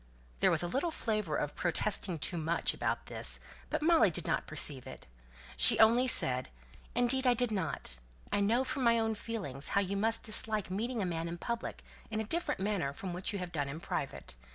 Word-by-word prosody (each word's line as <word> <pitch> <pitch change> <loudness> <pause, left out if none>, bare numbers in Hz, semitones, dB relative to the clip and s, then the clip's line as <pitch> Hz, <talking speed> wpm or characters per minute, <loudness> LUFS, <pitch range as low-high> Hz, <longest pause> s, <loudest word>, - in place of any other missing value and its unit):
There - - +5
was - - +2
a - - -1
little 275 - 0
flavour 215 - -1
of 145 - -2
"protesting 180 0 0
too 170 +3 -2
much" 165 +2 0
about - - -2
this; - - -2 0.3
but - - -1
Molly 320 - +5
did 165 - -4
not - - -1
perceive 145 -4 0
it. - - -10 0.5
She 65 - +7
only 230 +4 +5
said, 130 - +3 0.5
"Indeed 250 +2 +2
I 245 - +5
did 245 -1 +1
not. 190 - -2 0.3
I - - +2
know 225 +6 +2
from 265 0 -2
my 235 -1 +4
own 225 -1 +1
feelings 195 - -5
how - - +5
you 200 0 -2
must 225 +3 +1
dislike 215 -2 +1
meeting 225 +3 -2
a - - 0
man 165 -1 -2
in 170 +1 -5
public 235 +6 -4 0.3
in 220 -1 -2
a - - 0
different 330 - -1
manner 190 -8 -1
from 180 +4 -6
what 180 +2 -3
you 200 - -3
have 180 -2 -5
done 145 -4 -2
in 150 +3 -6
private. 165 - -4
205 Hz, 205 wpm, -32 LUFS, 170-230 Hz, 0.5 s, She